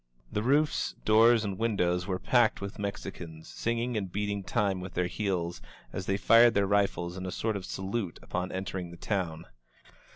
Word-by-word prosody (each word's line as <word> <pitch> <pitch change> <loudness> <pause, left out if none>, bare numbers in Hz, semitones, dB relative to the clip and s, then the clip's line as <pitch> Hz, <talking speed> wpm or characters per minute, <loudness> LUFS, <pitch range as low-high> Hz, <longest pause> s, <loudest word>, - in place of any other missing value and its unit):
The 105 - -1
roofs, 145 +6 +2
doors 110 +1 +6
and 95 -2 -4
windows 90 -5 +1
were 95 -2 0
packed 120 +2 +3
with 100 0 -6
Mexicans, 85 -5 -6
singing 115 +1 -2
and 95 -4 -2
beating 100 0 -2
time 100 -4 0
with 90 0 -8
their 90 - +1
heels, 90 - -2 0.3
as 95 - -4
they 95 - +1
fired 115 +3 +6
their 100 0 +3
rifles 95 -3 0
in 95 0 -4
a - - -3
sort 110 +3 -1
of 95 -2 -4
salute 95 -1 -3
upon 90 +1 -3
entering 95 -1 -4
the 85 - -11
town. 85 -5 -2
100 Hz, 175 wpm, -29 LUFS, 90-110 Hz, 0.3 s, doors